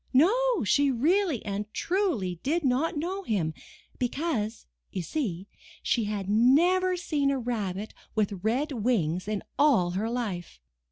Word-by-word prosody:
No, 455 - +4
she 280 +8 +3
really 310 - +1
and 205 +1 -3
truly 300 - 0
did 320 +5 0
not 270 +5 +1
know 365 +6 -2
him, 190 - -1 0.5
because, 245 -4 -2 0.2
you 185 - -4
see, 195 - -3 0.4
she 230 -3 +1
had 205 -2 -3
never 340 - +4
seen 295 -5 0
a 275 - +1
rabbit 215 -5 -3 0.2
with 205 -3 0
red 260 +8 0
wings 205 - 0
in 210 -2 -2 0.2
all 245 -12 +4
her 200 +5 -1
life. 200 - -4
245 Hz, 135 wpm, -28 LUFS, 205-310 Hz, 0.5 s, No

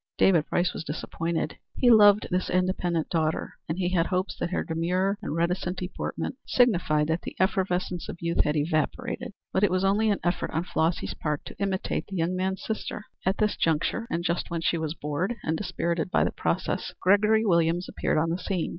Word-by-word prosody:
David 170 -5 +4
Price 180 +1 +1
was - - -5
disappointed. 165 +2 -3 0.2
He 245 -2 +5
loved 210 -2 +7
this 180 +1 0
independent 180 -3 0
daughter, 160 -2 -1
and 160 - -1
he 180 -2 0
had 175 -2 +2
hopes 185 +1 -1
that - - -1
her 185 - -1
demure 180 +5 0
and - - -3
reticent 180 +2 0
deportment 185 +6 -4
signified 180 -11 +3
that 160 +2 0
the - - -7
effervescence 185 -2 0
of - - -5
youth 170 0 +1
had 150 - 0
evaporated. 170 +11 -1 0.2
But 190 - +2
it 205 - +5
was 185 +1 +1
only 205 +3 +3
an 205 - +1
effort 175 0 0
on 165 - +1
Flossy's 165 -1 0
part 150 -2 -3
to - - -9
imitate 195 -1 -1
the 195 - -6
young 170 +2 0
man's 190 +1 -2
sister. 215 -1 -4 0.2
At 190 - +2
this 210 -1 +1
juncture 165 +8 0
and 170 -7 -1
just 175 0 -1
when 170 -1 -2
she 170 0 +1
was 160 0 -3
bored 160 +10 -2
and 160 - 0
dispirited 170 -2 -2
by - - +3
the - - 0
process, - - -2
Gregory 210 +3 +4
Williams 170 -1 +2
appeared - - -1
on 165 +2 +1
the 175 - -1
scene. 180 -2 -2
180 Hz, 200 wpm, -27 LUFS, 165-195 Hz, 0.2 s, loved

